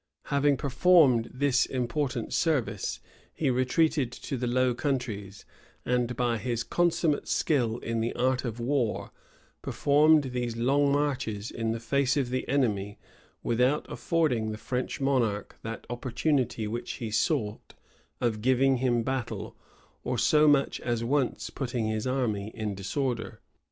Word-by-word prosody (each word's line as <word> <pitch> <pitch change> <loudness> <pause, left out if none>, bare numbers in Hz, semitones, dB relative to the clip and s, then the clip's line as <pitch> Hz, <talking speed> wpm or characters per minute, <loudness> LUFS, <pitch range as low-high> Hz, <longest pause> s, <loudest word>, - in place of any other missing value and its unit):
Having 140 0 +3
performed 140 -4 +4
this 130 0 +2
important 125 0 -2
service, 155 -8 0 0.3
he 145 -5 0
retreated 130 +1 +1
to 135 - -5
the 125 -1 -2
Low 125 +1 +2
Countries; 115 -7 -3 0.4
and, 125 0 0
by 120 -2 +1
his 120 -1 -2
consummate 170 -3 +1
skill 120 -7 +1
in 115 -1 -2
the 115 - -1
art 130 +1 +1
of 120 -2 -4
war, 120 -2 -1 0.5
performed 150 -1 +3
these 120 -2 -3
long 140 +4 +2
marches 130 -7 -1
in 115 -1 -2
the 115 - -3
face 135 +3 +1
of 130 -3 0
the 130 - -2
enemy, 105 -7 0 0.5
without 125 +5 +1
affording 135 -10 0
the 110 - -5
French 125 +3 -3
monarch 120 -7 0
that 115 0 -6
opportunity 125 0 -1
which 115 +3 -4
he 115 -3 -5
sought, 110 -1 -1 0.4
of 110 -3 -1
giving 130 +2 +3
him 120 -2 +1
battle, 130 -1 -3 0.5
or 125 0 -2
so 150 +6 +4
much 140 -2 +3
as 120 -2 -1
once 135 +2 -1
putting 120 -4 -2
his 110 +2 -2
army 115 -6 -1
in 110 -3 -3
disorder. 115 +5 -3
125 Hz, 140 wpm, -28 LUFS, 115-140 Hz, 0.5 s, performed